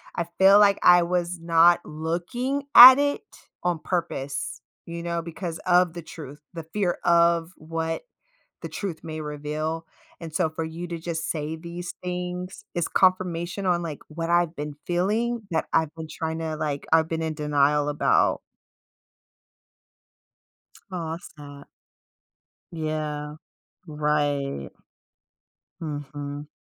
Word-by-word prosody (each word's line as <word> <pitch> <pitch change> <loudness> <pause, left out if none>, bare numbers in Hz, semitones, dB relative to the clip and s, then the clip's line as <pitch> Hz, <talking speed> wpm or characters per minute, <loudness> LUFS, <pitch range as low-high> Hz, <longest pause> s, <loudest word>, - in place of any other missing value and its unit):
I 170 - -1
feel 195 +1 +8
like 200 -1 +5
I 175 -1 +7
was 175 0 -1
not 165 +1 +5
looking 175 - -3
at 255 +2 +12
it 285 0 0 0.4
on 175 -2 0
purpose, 140 -8 -3 0.3
you 170 0 -6
know, 170 -1 -2
because 170 0 -6
of 180 -1 +4
the 175 - -6
truth, 150 -3 -10
the 165 -2 -6
fear 195 -4 0
of 170 0 +3
what 165 +1 -3 0.6
the - - -6
truth 185 -6 -5
may 155 -1 -6
reveal 150 +2 -4 0.3
and 165 -2 -8
so 160 -1 +1
for 160 +1 -4
you 165 +2 -6
to 170 0 -5
just 165 0 -4
say 155 0 -3
these 170 +2 -7
things 180 +1 -5
is 175 -2 -1
confirmation 185 0 +1
on, 175 -1 +1
like, 155 -4 -5
what 165 +2 -4
I've 175 -1 +2
been 150 0 -5
feeling 215 +7 0
that 160 - 0
I've 160 -2 +2
been 160 -1 -7
tryna, 160 0 -4
like 145 -2 -3
I've 160 0 +4
been 165 0 -3
in 160 -1 -2
denial 145 0 +2
about. 150 0 +2 2.5
Oh 170 -3 -4
that's 165 - -8
sad. 145 -1 -11 1.1
Yeah, 155 -2 -4 0.5
right. 145 - -1 1.1
Mhm. 145 -1 -6
165 Hz, 130 wpm, -25 LUFS, 150-175 Hz, 2.5 s, at